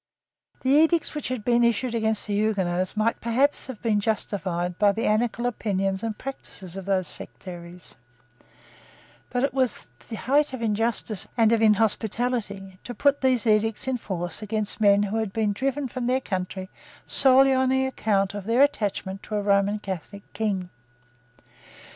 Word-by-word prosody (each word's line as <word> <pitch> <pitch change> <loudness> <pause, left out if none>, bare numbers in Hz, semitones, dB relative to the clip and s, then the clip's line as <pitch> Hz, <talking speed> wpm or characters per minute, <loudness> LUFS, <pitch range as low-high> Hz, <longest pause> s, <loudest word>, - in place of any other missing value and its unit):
The 260 - +2
edicts 320 +3 +4
which 300 - -4
had 250 -4 -4
been 240 -1 +3
issued 235 +1 +1
against 220 -2 0
the 205 - -3
Huguenots 190 -3 0
might 225 +2 0
perhaps 260 +7 +2
have 255 -4 -9
been 215 -3 +2
justified 185 -4 -2
by 205 -1 +4
the 225 - -2
anarchical 235 +2 +1
opinions 195 -5 -1
and 225 -2 -3
practices 195 -9 -8
of 195 -1 -6
those 190 -2 0
sectaries; 175 -1 -9 1.3
but 245 +1 -1
it 275 - 0
was 260 -3 0 0.2
the 225 - -4
height 280 +7 +1
of 260 - -5
injustice 220 -2 -1
and 225 -1 +4
of 230 -1 +3
inhospitality 215 -2 0
to 245 - -7
put 285 0 +2
those 255 -3 +2
edicts 220 +2 +1
in 260 -1 0
force 175 -5 -5
against 215 0 -1
men 205 -1 +5
who 205 +2 -2
had 220 -3 -2
been 215 -1 0
driven 275 +5 -2
from 250 -1 -4
their 255 +1 +2
country 185 -4 -4 0.4
solely 270 0 +5
on 260 0 +2
account 220 -7 0
of 205 -2 -6
their 235 +5 +4
attachment 205 -7 -1
to 215 - -6
a 205 - -1
Roman 200 +1 +2
Catholic 200 0 -7
King. 195 -5 -2
220 Hz, 160 wpm, -25 LUFS, 200-245 Hz, 1.3 s, men